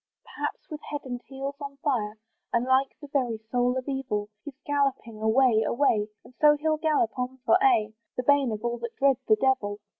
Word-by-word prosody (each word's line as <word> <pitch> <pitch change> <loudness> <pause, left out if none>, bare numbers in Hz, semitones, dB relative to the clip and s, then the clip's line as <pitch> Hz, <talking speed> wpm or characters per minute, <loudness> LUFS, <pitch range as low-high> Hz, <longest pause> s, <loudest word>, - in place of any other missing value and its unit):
Perhaps, - - -5
with 300 - -6
head 290 -1 -3
and 245 -2 -5
heels 275 +1 -5
on 280 -1 -7
fire, 225 -7 -1 0.3
And 235 +1 +1
like 260 +1 +2
the 295 - -10
very 255 -5 0
soul 245 0 +2
of 255 - -4
evil, 245 -7 -2
He's 290 -3 -9
galloping 275 -6 -1
away, 220 0 +4
away, 220 -4 +2 0.2
And - - -16
so 295 -1 +6
he'll 310 0 +1
gallop 305 -7 +1
on 250 +1 -3
for - - +5
aye, 220 - +3 0.2
The 250 - -1
bane 280 -2 +3
of 215 +2 -5
all 240 0 -1
that 235 0 -6
dread 275 -2 +4
the 215 - +6
devil. 255 -7 +1
260 Hz, 200 wpm, -27 LUFS, 230-280 Hz, 0.3 s, so